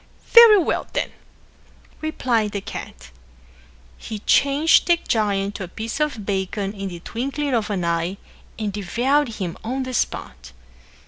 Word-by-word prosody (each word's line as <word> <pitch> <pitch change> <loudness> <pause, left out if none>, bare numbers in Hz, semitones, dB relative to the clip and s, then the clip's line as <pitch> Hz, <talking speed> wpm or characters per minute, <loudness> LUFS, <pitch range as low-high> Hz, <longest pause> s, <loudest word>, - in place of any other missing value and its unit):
"Very 465 -3 +9
well, 355 - 0
then," - - -1 0.9
replied 240 -9 0
the 200 - -3
cat. 60 - -9 0.9
He 220 - -6
changed 280 +8 +3
the 345 -1 +5
giant 205 -7 0
to 200 - -6
a - - -11
piece 225 - -5
of 285 -9 -1
bacon 195 0 -2
in 195 -1 -5
the 175 -2 -9
twinkling 275 - -3
of 225 -3 0
an 190 -4 -1
eye 170 +3 -1 0.4
and 210 -2 -3
devoured 245 +8 +1
him 185 -5 -5
on 260 +4 -2
the 255 0 -6
spot. 65 - -3
215 Hz, 145 wpm, -22 LUFS, 195-275 Hz, 0.9 s, Very